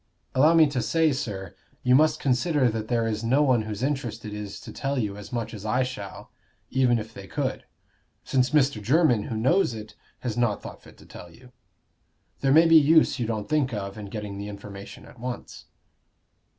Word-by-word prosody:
"Allow 150 Hz, +6 st, +5 dB
me 160 Hz, -1 st, +7 dB
to 140 Hz, -4 st, -1 dB
say, 160 Hz, +7 st, +2 dB
sir, 105 Hz, -7 st, -4 dB, 0.3 s
you 125 Hz, -, +3 dB
must 155 Hz, +3 st, +4 dB
consider 135 Hz, 0 st, +2 dB
that 110 Hz, -1 st, -4 dB
there 115 Hz, -1 st, +1 dB
is 110 Hz, 0 st, -2 dB
no 130 Hz, +6 st, +3 dB
one 130 Hz, -5 st, +3 dB
whose 110 Hz, +1 st, -5 dB
interest 120 Hz, -6 st, -2 dB
it 105 Hz, -, -6 dB
is 105 Hz, -1 st, -6 dB
to -, -, -9 dB
tell 135 Hz, +1 st, -2 dB
you 105 Hz, -5 st, -1 dB
as 105 Hz, 0 st, -10 dB
much 120 Hz, -2 st, -3 dB
as 105 Hz, -2 st, -8 dB
I 125 Hz, +4 st, +1 dB
shall, 115 Hz, -6 st, -7 dB, 0.4 s
even 125 Hz, -2 st, +3 dB
if 110 Hz, 0 st, -6 dB
they 100 Hz, -2 st, -10 dB
could; 135 Hz, +1 st, -3 dB, 0.6 s
since 130 Hz, -1 st, +1 dB
Mr. 140 Hz, -6 st, +2 dB
Jermyn, 125 Hz, -, +3 dB
who 110 Hz, -, -4 dB
knows 130 Hz, -, +2 dB
it, 110 Hz, 0 st, -9 dB, 0.3 s
has 120 Hz, -4 st, -3 dB
not 120 Hz, -4 st, 0 dB
thought -, -, -9 dB
fit -, -, -17 dB
to -, -, -17 dB
tell 90 Hz, -, -11 dB
you. 125 Hz, +6 st, -17 dB, 0.9 s
There 135 Hz, -, +1 dB
may 160 Hz, +4 st, +7 dB
be 165 Hz, 0 st, +7 dB
use 155 Hz, -1 st, +4 dB
you 120 Hz, -, -1 dB
don't 110 Hz, -2 st, -3 dB
think 140 Hz, -6 st, 0 dB
of 100 Hz, -1 st, -5 dB
in 105 Hz, -2 st, -8 dB
getting 100 Hz, -1 st, -6 dB
the 100 Hz, -, -5 dB
information 100 Hz, -1 st, -10 dB
at 125 Hz, -, -16 dB
once." 125 Hz, +1 st, -7 dB
120 Hz, 205 wpm, -26 LUFS, 105-135 Hz, 0.9 s, me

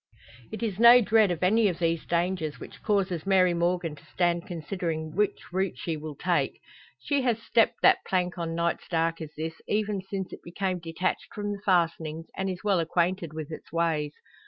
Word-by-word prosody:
It 220 Hz, -, -5 dB
is 210 Hz, -3 st, -2 dB
no 235 Hz, +1 st, +9 dB
dread 220 Hz, -2 st, +4 dB
of 175 Hz, -1 st, -2 dB
any 215 Hz, +4 st, +4 dB
of 180 Hz, -4 st, -1 dB
these 165 Hz, -2 st, -1 dB
dangers 170 Hz, -3 st, -1 dB
which -, -, -11 dB
causes 195 Hz, -5 st, 0 dB
Mary 185 Hz, -2 st, +4 dB
Morgan 170 Hz, -2 st, 0 dB
to -, -, -17 dB
stand 175 Hz, -1 st, 0 dB
considering 165 Hz, -2 st, -4 dB
which 205 Hz, -3 st, -1 dB
route 190 Hz, -1 st, -1 dB
she 165 Hz, -, -3 dB
will 155 Hz, -1 st, -7 dB
take. 175 Hz, +4 st, 0 dB, 0.4 s
She 285 Hz, -2 st, 0 dB
has 240 Hz, -4 st, +1 dB
stepped 230 Hz, 0 st, +2 dB
that -, -, +6 dB
plank 180 Hz, -1 st, 0 dB
on 165 Hz, -1 st, -3 dB
nights 170 Hz, 0 st, -1 dB
dark 165 Hz, -1 st, 0 dB
as 155 Hz, -, -5 dB
this, 160 Hz, +1 st, -5 dB
even 210 Hz, -2 st, 0 dB
since 190 Hz, 0 st, -5 dB
it -, -, -9 dB
became 185 Hz, +1 st, -2 dB
detached 165 Hz, +2 st, -3 dB
from 205 Hz, 0 st, -3 dB
the 200 Hz, -1 st, -5 dB
fastenings, 165 Hz, -4 st, +1 dB
and 190 Hz, 0 st, -2 dB
is 185 Hz, -1 st, -5 dB
well 200 Hz, -4 st, +2 dB
acquainted 170 Hz, +1 st, 0 dB
with 155 Hz, 0 st, -6 dB
its 155 Hz, -, -9 dB
ways. 160 Hz, -3 st, 0 dB
175 Hz, 190 wpm, -27 LUFS, 165-195 Hz, 0.4 s, no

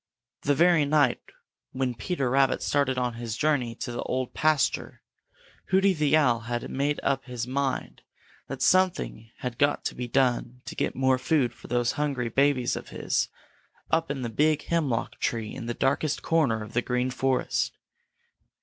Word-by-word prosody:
The 145 Hz, -, +2 dB
very 170 Hz, 0 st, +5 dB
night 145 Hz, -3 st, +2 dB, 0.5 s
when 130 Hz, -1 st, -1 dB
Peter 140 Hz, +2 st, -2 dB
Rabbit 135 Hz, 0 st, +3 dB
started 140 Hz, -3 st, +1 dB
on 125 Hz, -1 st, 0 dB
his 115 Hz, -1 st, -4 dB
journey 130 Hz, -7 st, +1 dB
to 120 Hz, -, -5 dB
the 120 Hz, -, -4 dB
Old 130 Hz, -1 st, -2 dB
Pasture, 155 Hz, -3 st, 0 dB, 0.6 s
Hooty 195 Hz, +1 st, +4 dB
the 155 Hz, -2 st, +3 dB
Owl 125 Hz, -6 st, +3 dB
had 120 Hz, 0 st, -4 dB
made 145 Hz, +2 st, 0 dB
up 135 Hz, -1 st, 0 dB
his 125 Hz, -2 st, -4 dB
mind 135 Hz, +1 st, -2 dB, 0.5 s
that -, -, -4 dB
something 185 Hz, -11 st, +2 dB
had 125 Hz, -2 st, -4 dB
got 145 Hz, 0 st, +2 dB
to -, -, -1 dB
be 125 Hz, 0 st, -5 dB
done 125 Hz, -1 st, 0 dB
to -, -, -6 dB
get -, -, -2 dB
more 130 Hz, 0 st, +2 dB
food 130 Hz, -3 st, +1 dB
for -, -, -14 dB
those 120 Hz, -1 st, +1 dB
hungry 140 Hz, -5 st, -1 dB
babies 135 Hz, 0 st, +2 dB
of -, -, -7 dB
his -, -, -1 dB, 0.6 s
up 165 Hz, -1 st, +2 dB
in 135 Hz, -2 st, -3 dB
the 120 Hz, -, -2 dB
big 150 Hz, +6 st, +2 dB
hemlock 145 Hz, -9 st, -1 dB
tree 115 Hz, -2 st, -2 dB
in 125 Hz, -3 st, -6 dB
the 120 Hz, -, -2 dB
darkest 140 Hz, +2 st, 0 dB
corner 135 Hz, -10 st, +2 dB
of 105 Hz, -, -11 dB
the 120 Hz, -, +2 dB
Green 125 Hz, +1 st, -1 dB
Forest. 130 Hz, +1 st, 0 dB
130 Hz, 170 wpm, -27 LUFS, 120-145 Hz, 0.6 s, very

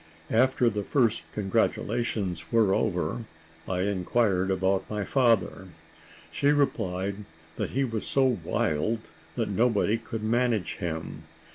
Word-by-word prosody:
After 125 Hz, +1 st, +3 dB
the 105 Hz, -3 st, 0 dB
first 115 Hz, -1 st, +2 dB
congratulations 105 Hz, -2 st, -1 dB
were 110 Hz, -5 st, +4 dB
over, 105 Hz, +5 st, -1 dB, 0.4 s
I 90 Hz, -1 st, -1 dB
inquired 95 Hz, 0 st, +1 dB
about 95 Hz, 0 st, 0 dB
my 105 Hz, -1 st, -2 dB
father; 115 Hz, -7 st, +2 dB, 0.6 s
she 140 Hz, -, 0 dB
replied, 100 Hz, -10 st, +1 dB, 0.4 s
that -, -, -2 dB
he 135 Hz, -, +3 dB
was 115 Hz, -4 st, -3 dB
so 130 Hz, -5 st, +2 dB
wild 85 Hz, +8 st, 0 dB, 0.3 s
that -, -, -1 dB
nobody 115 Hz, -1 st, +2 dB
could 115 Hz, -1 st, -6 dB
manage 115 Hz, -2 st, 0 dB
him. 80 Hz, -2 st, -5 dB
110 Hz, 120 wpm, -27 LUFS, 95-120 Hz, 0.6 s, were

